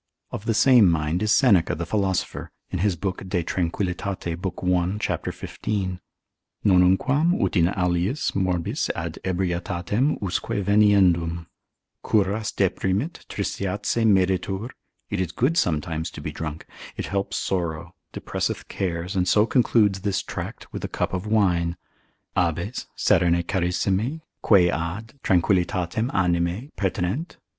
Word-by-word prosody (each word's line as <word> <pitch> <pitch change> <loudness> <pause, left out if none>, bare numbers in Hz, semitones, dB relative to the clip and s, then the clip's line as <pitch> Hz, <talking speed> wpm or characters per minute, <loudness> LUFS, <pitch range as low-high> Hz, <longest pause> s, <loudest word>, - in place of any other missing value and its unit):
Of 100 - -6
the 115 - +1
same 120 -5 +6
mind 80 +1 0
is 110 -1 +1
Seneca 110 - +4
the 85 - -4
philosopher, 95 -3 -1 0.2
in 90 - -2
his 100 -1 +1
book 95 +2 -3
de 90 -2 0
tranquil. 85 +3 -1
lib. 90 -2 -4 0.2
1. 90 +2 +1
c. - - 0 0.2
15. 95 -4 -4 0.7
nonnunquam 100 - +4
ut - - -3
in 85 -3 +4
aliis 90 - 0
morbis 90 -3 -1
ad - - -5
ebrietatem 95 - -1
usque 95 -3 -2
veniendum; 90 -5 +3 0.6
Curas 105 0 +1
deprimit, 100 - -1
tristitiae 100 +3 -1
medetur, 95 +3 +1 0.4
it 100 -2 0
is 90 -3 -2
good 130 - +1
sometimes 80 - 0
to - - -10
be - - -5
drunk, 80 -1 -6 0.3
it - - -3
helps 100 0 -2
sorrow, 85 -2 -2 0.2
depresseth - - -3
cares, 90 0 -3
and 90 -1 +1
so 105 +3 +4
concludes 110 -6 +3
this 100 -1 -1
tract - - -7
with - - -5
a - - -1
cup - - -2
of 95 +3 -3
wine: 90 -5 +2 0.6
Habes, 85 +7 -1
Serene 85 0 +3
charissime, 95 - 0 0.2
quae 90 -5 +5
ad, 90 +8 -4
tranquillitatem 90 +4 +1
animae, 90 - 0
pertinent. 95 - -2
95 Hz, 130 wpm, -24 LUFS, 85-105 Hz, 0.7 s, same